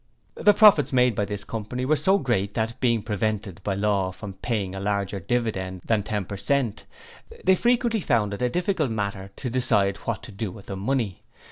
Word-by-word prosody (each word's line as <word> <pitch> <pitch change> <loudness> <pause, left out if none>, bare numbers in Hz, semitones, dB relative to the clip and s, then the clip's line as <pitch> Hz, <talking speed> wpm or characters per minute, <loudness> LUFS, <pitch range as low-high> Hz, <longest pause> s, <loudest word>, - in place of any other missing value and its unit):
The 205 -1 +4
profits 205 -9 +6
made 125 -2 +4
by 105 0 0
this 100 0 -5
Company 115 +4 -4
were 155 +4 +3
so 190 +6 +3
great 105 - -1
that, 110 +1 -2
being 115 -4 +2
prevented 105 -2 -2
by 100 -2 -1
law 100 -2 +1
from 100 +1 -8
paying 100 -2 -2
a 95 - -5
larger 100 0 -1
dividend 95 -4 -2
than 110 -2 +2
ten 105 -2 -3
percent, 110 +4 -1 0.6
they 190 - +5
frequently 235 +1 +2
found 105 - +1
it 100 - -6
a 125 - +2
difficult 175 -1 0
matter 100 -3 -3
to 125 - -4
decide 105 -6 +2
what 115 -4 -4
to - - -9
do 100 0 -4
with 100 +1 -12
the 100 - -5
money. 110 -1 -1
110 Hz, 195 wpm, -25 LUFS, 100-125 Hz, 0.6 s, profits